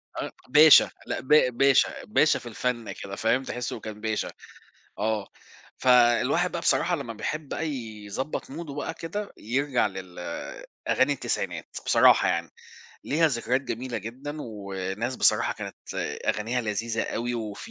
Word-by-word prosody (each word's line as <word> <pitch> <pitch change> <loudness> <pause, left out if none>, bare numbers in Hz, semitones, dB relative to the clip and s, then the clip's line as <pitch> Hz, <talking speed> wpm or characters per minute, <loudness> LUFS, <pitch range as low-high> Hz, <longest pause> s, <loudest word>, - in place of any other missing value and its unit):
أ - - -3 0.2
باشا 150 +3 +8 0.2
لأ - - -3
ب 130 - -12 0.3
باشا، 135 0 +3
باشا - - +3
في - - -15
الفن 125 -3 -2
كده، 100 0 -7
فاهم، 115 +4 +1
تحسه 125 -2 -4
كان 105 -1 -8
باشا، 110 -1 -2 0.7
آه. 105 -1 -1 0.5
فالواحد 125 +7 +4
بقى 170 - -2
بصراحة 175 +1 +2
لما 135 -6 -5
بيحب 150 +7 -4
بقى 160 +1 -2
يضبط 115 0 -5
موده 150 0 -7
بقى 145 - -4
كده 200 +5 -5
يرجع 130 +3 0
لل 95 -2 -8 0.7
أغاني - - +3
التسعينات، - - -3 0.2
بصراحة - - +6
يعني، 85 -2 -1 0.5
ليها 160 +3 +3
ذكريات 125 0 0
جميلة 125 -2 -4
جدًا 130 +8 -7
وناس 100 +1 -4
بصراحة - - +3
كانت - - -7 0.5
أغانيها 115 +4 0
لذيذة 115 +1 -2
أوي 120 +1 -2
وفي 110 -3 -6
120 Hz, 140 wpm, -26 LUFS, 110-140 Hz, 0.7 s, باشا